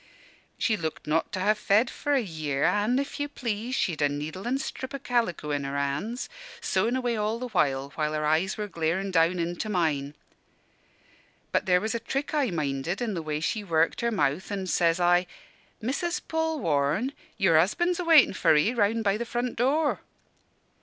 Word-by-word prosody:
She 220 - +1
looked 160 -3 -4
not 155 +2 0
to 190 - -2
ha' 210 +3 +4
fed 210 +3 +3
for 290 +3 -2
a 270 - +3
year; 155 -6 -3
an', 210 +5 +2
if 280 +1 -3
you 290 0 -2
please, 235 -1 -3
she'd 165 - -1
a 145 - +4
needle 155 +8 -5
and 265 +2 0
strip 260 0 -5
o' - - -2
calico 230 - -1
in 145 -1 -1
her 140 +1 -3
hands, 145 - -2 0.3
sewin' 235 +3 0
away 245 -2 0
all 215 +1 -1
the 250 +1 -5
while 140 - 0
her 155 0 -1
eyes 160 +5 +1
were 210 -1 -3
glarin' 180 +2 -1
down 170 +1 +3
into 175 +5 -2
mine. 150 -7 0 1.4
"But - - 0
there 180 -1 +5
was 220 +3 -2
a 235 - -1
trick 275 +6 -3
I 290 -5 +2
minded 155 +1 -2
in 235 -3 -2
the 170 - -3
way 155 -1 -3
she 210 +6 -1
worked 165 0 +1
her 235 - +1
mouth, 185 -6 0
an' 195 -2 -2
says 170 -2 +2
I, 175 +1 +3 0.6
'Missus 335 +9 -1
Polwarne, 245 - 0 0.2
your 165 -5 +4
husband's 345 - +1
a - - -1
waitin' 325 - +6
for 165 -4 +3
'ee, 150 +11 +3
round 225 0 +1
by 200 0 +2
the 235 - -2
front 240 +1 -2
door.' 285 +6 +1
195 Hz, 185 wpm, -27 LUFS, 160-240 Hz, 1.4 s, waitin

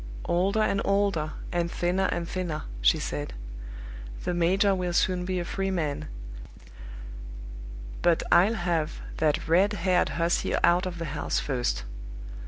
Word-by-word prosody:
"Older 195 +5 +2
and 200 -2 +1
older, 195 -6 +1 0.2
and 170 -1 0
thinner 180 +3 0
and 170 -1 -2
thinner!" 170 -5 -3 0.2
she - - +5
said. 75 -4 -4 0.9
"The 180 - -1
major 190 +4 +3
will 180 -2 -2
soon 180 0 +1
be 185 0 -1
a 175 - -3
free 195 +2 -2
man; 155 -6 -2 1.9
but 170 -2 +3
I'll 190 +7 +5
have 170 -6 -1 0.2
that 155 -1 +1
red 190 +6 +4
haired 185 -2 +2
hussy 170 +1 +1
out 175 +2 +4
of 175 -1 -5
the 165 - -4
house 145 - -1
first!" 120 - -1
175 Hz, 140 wpm, -27 LUFS, 165-190 Hz, 1.9 s, she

